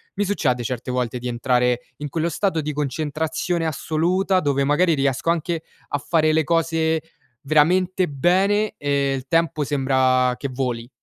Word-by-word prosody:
mi 205 - 0
succede 130 -11 0
certe 125 +2 -4
volte 125 -1 -2
di 125 - -5
entrare 125 0 +1 0.2
in 150 - -5
quello 165 +3 -1
stato 170 0 0
di 150 0 -3
concentrazione 155 +4 -2
assoluta, 175 +5 0
dove 140 -3 +1
magari 160 +5 +3
riesco 135 +1 0
anche 165 0 -2 0.3
a 145 - 0
fare 155 +1 +1
le 160 0 +3
cose 165 -1 +1 0.4
veramente 180 +5 +2
bene, 190 +9 +1
e 140 -1 0
il 130 0 -7
tempo 165 -2 +1
sembra 130 -2 +2
che 140 - -4
voli. 125 -2 -3
150 Hz, 150 wpm, -22 LUFS, 130-165 Hz, 0.4 s, magari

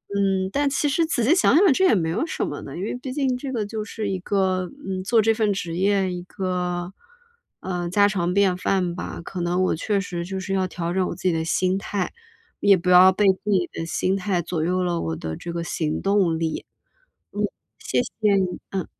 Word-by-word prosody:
嗯， 195 -1 +1
但 285 0 +2
其 275 +2 0
实 325 +4 +2
仔 315 -7 0
细 265 +9 +5
想 365 - +4
想 365 -4 +6
这 375 - +3
也 365 - +5
没 165 -4 0
有 205 - 0
什 - - -2
么 145 - -5
的， 135 - -8
因 180 - -4
为 210 - -3
毕 260 - -5
竟 270 -2 0
这 265 +1 -5
个 220 -4 -1
就 215 +1 -4
是 210 0 -4
一 190 -1 -2
个， 185 -1 0 0.2
嗯， 190 -1 -2
做 225 +3 +3
这 225 +1 +3
份 215 -2 +1
职 175 -4 -4
业 195 0 +2
一 180 0 -4
个， 180 -1 -3 0.7
呃， 175 -2 -3
家 205 +3 +4
常 180 -3 -1
便 195 -2 +3
饭 185 -1 0
吧， 180 - -6
可 185 - -6
能 175 +2 +1
我 - - +2
确 200 +5 0
实 175 -3 -4
就 190 +2 -5
是 195 +1 -4
要 190 -1 +1
调 175 -1 -4
整 185 0 +1
我 - - -4
自 - - -13
己 185 - +3
的 160 0 -1
心 185 +3 +1
态， 195 0 -3 0.5
也 200 -1 +6
不 180 +1 -2
要 180 +1 +8
被 205 +2 +1
自 190 +2 +1
己 180 -3 +2
的 165 - -4
心 185 +3 0
态 185 -2 0
左 165 -1 -2
右 180 +1 +1
了 175 -1 0
我 80 0 -2
的 80 0 -5
这 170 - -6
个 170 0 -3
行 155 -1 -2
动 195 -5 +2
力。 160 -1 -2 0.7
嗯， - - -3 0.4
谢 - - 0
谢 - - -9 0.2
你， 185 -2 0
嗯。 190 -4 -2
185 Hz, 250 characters per minute, -23 LUFS, 175-205 Hz, 0.7 s, 要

